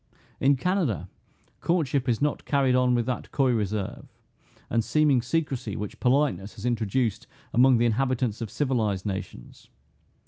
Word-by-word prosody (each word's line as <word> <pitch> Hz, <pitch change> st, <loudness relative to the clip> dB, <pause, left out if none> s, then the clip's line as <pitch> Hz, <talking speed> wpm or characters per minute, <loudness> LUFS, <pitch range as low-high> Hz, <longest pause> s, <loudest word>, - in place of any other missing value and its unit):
In 140 Hz, +1 st, +4 dB
Canada, 135 Hz, -, -1 dB, 0.5 s
courtship 145 Hz, -7 st, 0 dB
is 120 Hz, +3 st, +1 dB
not 150 Hz, -, 0 dB
carried 135 Hz, -3 st, +2 dB
on 125 Hz, -1 st, +3 dB
with 120 Hz, -1 st, +1 dB
that 125 Hz, 0 st, -4 dB
coy 135 Hz, -3 st, +2 dB
reserve, 105 Hz, -3 st, -2 dB, 0.6 s
and 115 Hz, -1 st, +1 dB
seeming 150 Hz, -1 st, +3 dB
secrecy, 130 Hz, -5 st, -2 dB
which 105 Hz, -1 st, -6 dB
politeness 125 Hz, -7 st, +1 dB
has 105 Hz, -, -8 dB
introduced 115 Hz, -1 st, -1 dB, 0.3 s
among 125 Hz, +1 st, +5 dB
the 120 Hz, -, +2 dB
inhabitants 120 Hz, -1 st, 0 dB
of 115 Hz, -, -4 dB
civilized 110 Hz, -9 st, -1 dB
nations. 95 Hz, -11 st, -7 dB
125 Hz, 140 wpm, -26 LUFS, 110-135 Hz, 0.6 s, among